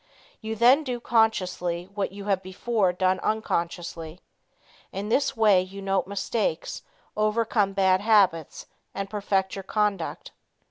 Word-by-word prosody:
You 220 0 -4
then 250 +7 +5
do 250 -4 -3
consciously 185 -7 +1
what 200 -2 -2
you 200 0 -9
have 195 -2 +1
before 190 +1 0
done 185 +1 +1
unconsciously. 170 -5 -3 0.7
In 200 +2 -5
this 270 +1 +1
way 210 -4 +5
you 190 +2 -8
note 195 -2 -1
mistakes, 200 -3 -2 0.3
overcome 215 -1 +1
bad 190 -1 +3
habits 195 -8 +2 0.3
and 195 0 -4
perfect 195 -2 -1
your 195 - -5
conduct. 205 -3 -2
195 Hz, 130 wpm, -26 LUFS, 185-220 Hz, 0.7 s, then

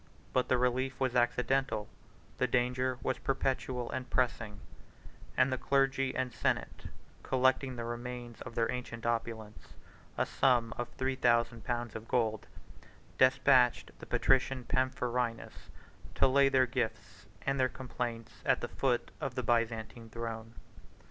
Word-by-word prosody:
But 130 - +2
the 130 - +3
relief 125 +1 0
was 130 -2 +1
accidental, 125 -2 +1 0.5
the 125 - +3
danger 125 +1 +1
was 130 - -1
perpetual 130 -2 -1
and 130 0 -4
pressing; 115 -5 0 0.8
and 130 +1 +4
the 130 - -2
clergy 135 -1 +1
and 130 -2 -1
senate, 115 - -1 0.4
collecting 130 0 +2
the 120 - -4
remains 120 0 -6
of 115 - -8
their 115 -1 +1
ancient 120 -2 -5
opulence, 115 -2 -3 0.4
a - - +2
sum 120 -4 +2
of 120 0 -4
three 130 0 0
thousand 120 -2 +2
pounds 120 -3 -2
of 110 0 -7
gold, 110 -4 0 0.7
despatched 130 -1 +4
the - - -10
patrician 130 -1 +2
Pamphronius 125 -2 -1 0.5
to - - +5
lay 140 +1 +5
their 130 -1 +4
gifts 120 -3 -4 0.2
and 135 0 0
their 130 0 +3
complaints 120 -3 -5
at - - +2
the - - -2
foot - - 0
of - - -3
the - - -2
Byzantine 115 -1 -1
throne. 115 0 -6
125 Hz, 140 wpm, -32 LUFS, 115-130 Hz, 0.8 s, to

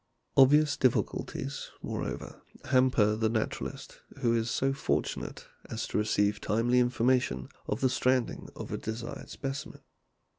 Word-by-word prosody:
Obvious 145 +2 +6
difficulties, 130 -3 -1
moreover, - - -4 0.3
hamper 125 -5 +4
the 110 0 +1
naturalist 110 -1 -3 0.2
who 115 -1 +3
is 115 0 0
so 135 +2 +1
fortunate 135 - -2 0.2
as 110 -1 -3
to - - -2
receive 105 -1 +1
timely 120 +4 +2
information 125 - +1 0.2
of 105 - -2
the 130 - +5
stranding 130 -1 +1
of - - -7
a - - -2
desirable 115 +2 -5
specimen. 135 -1 -5
120 Hz, 125 wpm, -30 LUFS, 110-130 Hz, 0.3 s, Obvious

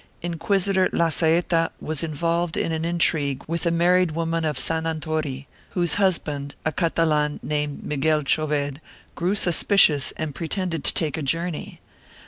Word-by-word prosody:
Inquisitor 185 +3 +1
Lazaeta 165 0 +2
was 155 -1 -3
involved 165 +2 -1
in - - 0
an 160 0 -2
intrigue 155 -5 +1
with 170 +2 -2
a - - +4
married 175 0 +3
woman 165 0 -1
of 150 -3 -1
San 160 +4 0
Anton, 155 -4 -3 0.3
whose 175 -3 +2
hus 190 -4 +3
band, 145 -1 -6
a 155 - +1
Catalan 155 -3 +1
named 150 -1 -2
Miguel 150 +1 +1
Choved, 145 -1 0 0.3
grew 180 +4 0
suspicious 175 -6 +3
and 155 -3 -3
pre 165 - -5
tended 175 -4 -2
to - - +5
take 155 -3 0
a - - -4
journey. 165 +4 -3
160 Hz, 150 wpm, -23 LUFS, 150-170 Hz, 0.3 s, to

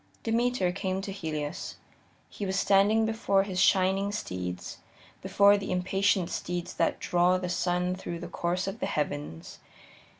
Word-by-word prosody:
Demeter 230 -4 +1
came 190 0 -2
to 195 - -5
Helios. 155 -6 -4 0.5
He - - -8
was 190 0 -1
standing 205 +3 +4
before 210 -3 +1
his 185 -2 -2
shining 195 +1 +3
steeds, 90 - -5 0.4
before 200 0 +5
the 195 - -5
impatient 185 0 +1
steeds 175 0 -4
that - - 0
draw 180 +1 +2
the 180 -1 -4
sun 180 0 0
through 185 -2 -5
the 170 - -7
course 175 +2 -2
of 195 +3 -5
the - - -1
heavens. 145 - -4
185 Hz, 145 wpm, -28 LUFS, 175-200 Hz, 0.5 s, before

